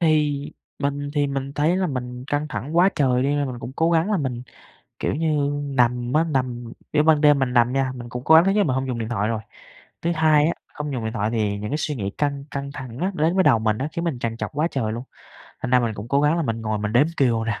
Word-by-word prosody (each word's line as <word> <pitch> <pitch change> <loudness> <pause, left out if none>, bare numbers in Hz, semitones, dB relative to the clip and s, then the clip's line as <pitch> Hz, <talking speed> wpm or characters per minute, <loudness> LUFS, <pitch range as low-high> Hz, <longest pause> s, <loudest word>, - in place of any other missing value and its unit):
Thì 150 -3 +1 0.3
mình 145 0 -2
thì 145 -1 +2
mình 135 0 -3
thấy 155 +5 +2
là 190 -1 +1
mình 125 -3 -5
căng 145 +1 -1
thẳng 150 +4 -4
quá 180 +3 +6
trời 130 -3 +2
đi 135 - +1
nên 145 -1 +1
mình 125 -2 -5
cũng 125 +2 -7
cố 165 +1 +2
gắng 165 +5 +2
là 205 - +2
mình, 125 -6 -3 0.6
kiểu - - -1
như, 150 -2 +1
nằm 125 -2 +1
á 155 +2 +4
nằm, 125 -6 -2 0.2
kiểu 150 0 +4
ban 155 -1 +4
đêm 145 -2 +5
mình 125 -2 0
nằm 120 +1 +3
nha, 135 -1 +1
mình 120 -1 -8
cũng 125 0 -6
cố 160 - +6
gắng 165 +3 +7
thứ 195 - +3
nhất 210 - +1
là 205 - +5
mình 130 -7 0
không 130 0 -1
dùng 125 - -2
điện 110 0 -3
thoại 105 -2 0
rồi. 110 -1 -2 0.6
Thứ 170 - 0
hai 155 -2 +4
á, 165 - +2 0.2
không 150 -1 -4
dùng 120 -3 -3
điện 110 +1 -3
thoại 110 -1 0
thì 105 -3 0
những 105 +1 -5
cái 150 - 0
suy 150 -1 -2
nghĩ 100 -4 -3
căng 140 -1 -1
căng 140 0 -4
thẳng 130 -3 -8
á 190 +3 0
đến 160 +4 +1
với 190 - +4
đầu 115 - +5
mình 110 -1 +1
á, 140 - -2
khiến 170 - -3
mình 145 -7 -2
trằn 115 -1 -3
trọc - - -4
quá 150 +3 +1
trời 110 -5 -1
luôn. 120 - -5 0.6
Thành 130 - -2
ra 125 -1 +5
mình 115 -2 -1
cũng 105 +3 -7
cố 140 +2 +2
gắng 150 +3 +3
là 170 - 0
mình 115 -4 -2
ngồi 110 -1 -2
mình 105 +1 -2
đếm 130 +6 +5
cừu 115 -4 +2
nè, 110 -2 -2
135 Hz, 285 wpm, -23 LUFS, 120-150 Hz, 0.6 s, gắng